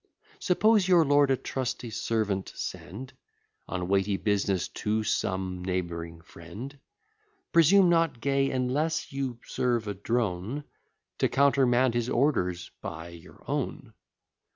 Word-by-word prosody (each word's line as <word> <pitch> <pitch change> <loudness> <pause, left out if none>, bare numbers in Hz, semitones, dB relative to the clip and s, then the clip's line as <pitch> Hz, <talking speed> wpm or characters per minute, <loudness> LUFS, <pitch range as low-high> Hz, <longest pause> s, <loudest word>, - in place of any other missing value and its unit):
Suppose 210 - +3
your 175 -3 +5
lord 145 0 +4
a 135 - +3
trusty 125 -2 -4
servant 110 -3 -1
send 130 - -7 0.5
On 90 -1 -3
weighty 100 +1 +1
business 100 -3 0
to 110 +1 -1
some 95 -3 -2
neighbouring 85 -3 -4
friend: 100 - -10 0.7
Presume 180 +3 +6
not, 165 -6 +2
Gay, 135 +2 +1
unless 135 +5 -1
you 135 -3 -3
serve 120 -3 -1
a 100 - -2
drone, 110 +4 -2 0.6
To - - +2
countermand 130 -3 +3
his 120 0 -1
orders 110 -11 0
by 80 +1 -6
your 85 -1 -14
own. - - -3
120 Hz, 120 wpm, -28 LUFS, 95-140 Hz, 0.7 s, Presume